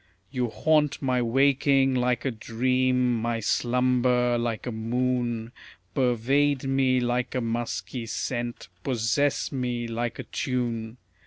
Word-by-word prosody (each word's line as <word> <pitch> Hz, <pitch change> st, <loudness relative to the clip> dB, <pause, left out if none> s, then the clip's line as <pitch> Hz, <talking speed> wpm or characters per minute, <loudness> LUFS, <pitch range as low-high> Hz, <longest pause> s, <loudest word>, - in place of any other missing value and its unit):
You 125 Hz, -3 st, -1 dB
haunt 150 Hz, +2 st, +2 dB
my 130 Hz, -2 st, +1 dB
waking 135 Hz, +2 st, +3 dB
like 125 Hz, 0 st, 0 dB
a 135 Hz, -, +1 dB
dream, 125 Hz, +1 st, +1 dB
my 115 Hz, 0 st, -1 dB
slumber 125 Hz, +2 st, +2 dB
like 120 Hz, -2 st, -2 dB
a 125 Hz, -, -2 dB
moon, 120 Hz, 0 st, -1 dB, 0.4 s
Pervade 135 Hz, +4 st, +2 dB
me 135 Hz, -1 st, +2 dB
like 125 Hz, +1 st, -1 dB
a -, -, +2 dB
musky 115 Hz, -1 st, -3 dB
scent, 120 Hz, 0 st, -3 dB, 0.2 s
possess 135 Hz, +3 st, 0 dB
me 125 Hz, -3 st, -2 dB
like 120 Hz, +1 st, -3 dB
a -, -, -5 dB
tune. 120 Hz, -4 st, -3 dB
125 Hz, 120 wpm, -26 LUFS, 120-130 Hz, 0.4 s, waking